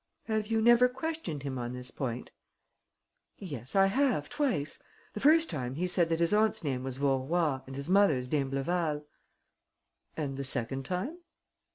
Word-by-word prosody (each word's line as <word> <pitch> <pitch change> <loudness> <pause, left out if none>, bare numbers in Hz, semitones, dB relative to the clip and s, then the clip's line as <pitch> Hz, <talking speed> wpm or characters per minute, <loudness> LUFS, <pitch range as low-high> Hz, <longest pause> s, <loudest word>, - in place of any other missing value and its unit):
"Have 215 -2 -1
you 225 0 +1
never 240 +2 +6
questioned 265 - -4
him 135 -2 -4
on 120 0 -4
this 125 0 -5
point?" 125 -3 -4 1.1
"Yes, 140 - -6
I 195 0 +6
have, 210 - +1
twice. 250 - -1 0.3
The - - -5
first 320 +3 +5
time, 125 -2 -4
he 175 +5 -1
said 175 -2 +2
that 165 0 0
his 170 +4 +3
aunt's 215 -2 +2
name 130 -4 -2
was 130 -1 -3
Vaurois 140 +2 +1
and 135 - -8
his 140 +1 -5
mother's 180 -10 +3
d'Imbleval." 150 +3 -1 1.1
"And 140 -4 -3
the 140 - -3
second 130 0 0
time?" 220 - -3
155 Hz, 160 wpm, -30 LUFS, 135-210 Hz, 1.1 s, never